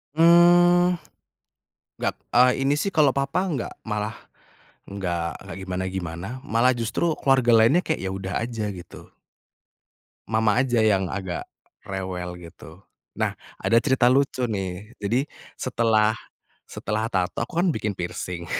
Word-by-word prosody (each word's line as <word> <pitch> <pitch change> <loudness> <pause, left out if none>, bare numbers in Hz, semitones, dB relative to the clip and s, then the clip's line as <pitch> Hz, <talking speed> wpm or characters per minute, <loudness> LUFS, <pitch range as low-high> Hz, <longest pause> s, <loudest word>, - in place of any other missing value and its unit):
Mmm, 175 +1 +5 1.0
gat - - -1 0.2
eee, 125 +2 +4
ini 140 - +3
sih 155 +7 -1
kalau 150 -7 +3
papa 140 +7 0
gak 125 - -4
malah 105 0 -3 0.7
gak 90 -4 -4
gak - - -9
gimana-gimana, 95 +3 -4
malah 115 +3 +3
justru 135 +8 -1
keluarga 135 -3 +2
lainnya 115 +11 +5
kayak 160 -3 -2
ya 95 - -2
udah 95 -1 -5
aja 115 -3 -4
gitu. 90 -4 -10 1.2
Mama 110 +1 +2
aja 120 -3 +1
yang 95 -4 +2
agak, 95 -3 -4 0.4
rewel 95 -3 -5
gitu, 85 -1 -13 0.4
nah - - 0 0.2
ada 115 0 +3
cerita 130 -3 +2
lucu 130 0 +2
nih 100 0 -5
jadi 120 +7 0 0.3
setelah, 110 -3 +2 0.6
setelah 110 +2 -3
tato 95 -2 -1
aku 120 +8 -5
kan 175 -1 +2
bikin 105 -6 -3
piercing, 90 0 -5
110 Hz, 130 wpm, -24 LUFS, 95-135 Hz, 1.2 s, Mmm